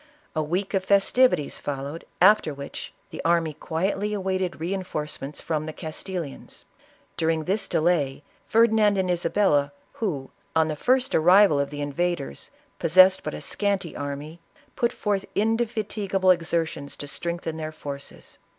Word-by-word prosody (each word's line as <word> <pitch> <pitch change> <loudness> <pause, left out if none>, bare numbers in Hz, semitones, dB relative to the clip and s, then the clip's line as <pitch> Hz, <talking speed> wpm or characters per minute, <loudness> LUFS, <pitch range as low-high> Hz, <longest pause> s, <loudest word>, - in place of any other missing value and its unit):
A 155 - +1
week 180 +7 -2
of 190 -1 +1
festivities 200 - +3
followed, 140 +3 -5
after 185 -6 +5
which 140 0 -7 0.2
the - - -6
army 165 -2 +2
quietly 195 +7 -2
awaited 190 -3 -2
reinforcements 155 -5 -4
from 155 -1 -2
the 155 - -5
Castilians. 160 -1 -6 0.5
During 160 -1 +1
this 195 +6 -1
delay, 150 -4 +1 0.2
Ferdinand 220 -2 +4
and 185 -1 +1
Isa 170 -1 0
bella, 145 -9 +2 0.2
who, 150 -12 -3 0.2
on 160 0 +3
the 155 - -2
first 255 - +2
arrival 180 -1 +6
of 140 0 0
the 145 0 -6
invaders, 155 - -2 0.3
possessed 185 +3 +6
but - - -4
a - - -7
scanty 200 -4 -1
army, 145 +3 -6 0.4
put 235 - +1
forth 200 -2 -1
indefatigable 215 -4 +1
exertions 165 -4 -1
to - - -6
strengthen 170 +2 -4
their 155 0 -4
forces. 140 -2 -9
170 Hz, 140 wpm, -25 LUFS, 150-195 Hz, 0.5 s, arrival